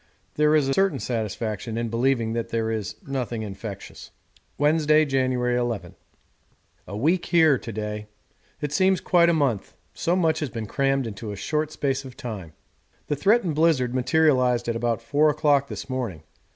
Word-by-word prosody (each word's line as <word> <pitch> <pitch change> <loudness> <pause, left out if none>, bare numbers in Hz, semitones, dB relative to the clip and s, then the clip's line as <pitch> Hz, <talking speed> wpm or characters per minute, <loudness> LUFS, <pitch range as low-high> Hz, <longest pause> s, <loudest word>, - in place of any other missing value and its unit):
There 150 +1 +3
is 150 -3 +3
a 135 - +1
certain 195 -3 +2
satisfaction 110 -1 -3
in 115 0 -2
believing 115 -1 +1
that 115 0 -3
there 115 -1 -1
is 110 -4 -3
nothing 125 -5 -3
infectious. 100 0 -8 0.5
Wednesday, 155 +1 +4
January 130 -3 +1
ll. 120 -3 -1 1.1
A 100 - -6
week 165 +9 +1
here 160 -6 +4
to 115 - -7
day 105 0 -5 0.5
it 150 - -2
seems 185 +4 +3
quite 170 -1 +4
a - - +5
month, 140 -10 0 0.2
so 170 - 0
much 165 -4 +2
has 150 - -2
been 115 -3 -5
crammed 135 +4 0
into 105 -1 -6
a - - -5
short 150 +9 -2
space 140 -3 -1
of 130 -2 -11
time. 100 -9 -7 0.6
The 145 - +1
threatened 195 - +2
blizzard 145 -6 +2
materialised 130 -3 +2
at 115 - 0
about 115 0 -1
four 150 +6 +3
o'clock 145 -2 +2
this - - -7
morning. 120 - -4
130 Hz, 165 wpm, -24 LUFS, 115-150 Hz, 1.1 s, a